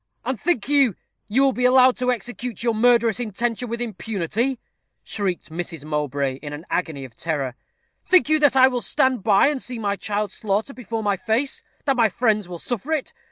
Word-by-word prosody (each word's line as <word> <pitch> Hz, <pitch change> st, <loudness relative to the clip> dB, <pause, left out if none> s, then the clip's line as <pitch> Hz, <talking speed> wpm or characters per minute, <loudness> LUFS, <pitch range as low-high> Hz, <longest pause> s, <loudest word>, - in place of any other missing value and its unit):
"And 255 Hz, -2 st, -3 dB
think 335 Hz, -, +1 dB
you, 275 Hz, -8 st, +3 dB, 0.3 s
you 250 Hz, +6 st, +2 dB
will 270 Hz, -1 st, +3 dB
be 250 Hz, -, -2 dB
allowed 255 Hz, 0 st, +6 dB
to 250 Hz, 0 st, +1 dB
execute 245 Hz, -1 st, -5 dB
your 235 Hz, -1 st, +2 dB
murderous 235 Hz, 0 st, +3 dB
intention 235 Hz, +1 st, -2 dB
with 235 Hz, +1 st, -3 dB
impunity?" 220 Hz, +3 st, -2 dB, 0.5 s
shrieked 190 Hz, -6 st, -3 dB
Mrs. 165 Hz, -2 st, -4 dB
Mowbray, 145 Hz, -3 st, -1 dB
in 145 Hz, -1 st, -7 dB
an 150 Hz, +4 st, -8 dB
agony 160 Hz, -6 st, -2 dB
of 120 Hz, -3 st, -14 dB
terror. 140 Hz, -5 st, -2 dB, 0.5 s
"Think 370 Hz, -4 st, +5 dB
you 310 Hz, 0 st, +3 dB
that 290 Hz, -2 st, +4 dB
I 260 Hz, 0 st, +8 dB
will 250 Hz, -2 st, -1 dB
stand 260 Hz, -2 st, +1 dB
by 200 Hz, +2 st, +4 dB
and 285 Hz, -3 st, -2 dB
see 250 Hz, -1 st, -6 dB
my 200 Hz, -3 st, -1 dB
child 205 Hz, 0 st, -2 dB
slaughtered 215 Hz, +7 st, -2 dB
before 225 Hz, -2 st, -4 dB
my 200 Hz, -1 st, +1 dB
face; 235 Hz, +7 st, -1 dB, 0.2 s
that 275 Hz, -3 st, +1 dB
my 230 Hz, -2 st, +4 dB
friends 210 Hz, -3 st, 0 dB
will 175 Hz, -, -6 dB
suffer 245 Hz, -, -4 dB
it? 305 Hz, -4 st, -2 dB
225 Hz, 195 wpm, -23 LUFS, 185-250 Hz, 0.5 s, I